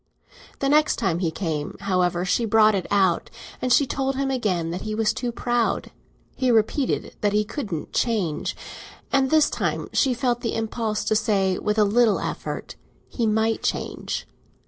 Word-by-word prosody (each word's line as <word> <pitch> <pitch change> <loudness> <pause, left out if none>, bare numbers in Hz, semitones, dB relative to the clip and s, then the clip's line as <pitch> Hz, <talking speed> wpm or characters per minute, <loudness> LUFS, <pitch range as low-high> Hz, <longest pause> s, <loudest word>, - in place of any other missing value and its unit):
The 275 - -1
next 300 +2 +4
time 170 0 0
he 175 -3 0
came, 160 -3 -3
however, 180 -2 +1
she 210 +5 +1
brought 215 -1 +5
it 190 -3 -2
out, 190 -4 +2 0.3
and 255 - -1
she 280 - +5
told 270 +1 -1
him 270 0 -1
again 185 -10 -1
that 180 +2 -4
he 215 0 -3
was 220 -1 +1
too 245 -1 -3
proud. 235 -3 -1 0.4
He 260 -1 0
repeated 235 +4 +1
that 205 -1 +1
he 210 0 +3
couldn't 210 - -5
change, 200 -11 0 0.6
and 270 -1 +3
this 310 0 +5
time - - -2
she 260 -3 +2
felt 240 -1 0
the 230 - -2
impulse 220 -1 -2
to 215 - +1
say 205 -3 +2
that - - -5
with 210 +1 0
a 215 - +5
little 220 +1 +3
effort - - -5 0.3
he 235 -3 -1
might 220 +1 +1
change. - - -3
220 Hz, 175 wpm, -24 LUFS, 195-245 Hz, 0.6 s, brought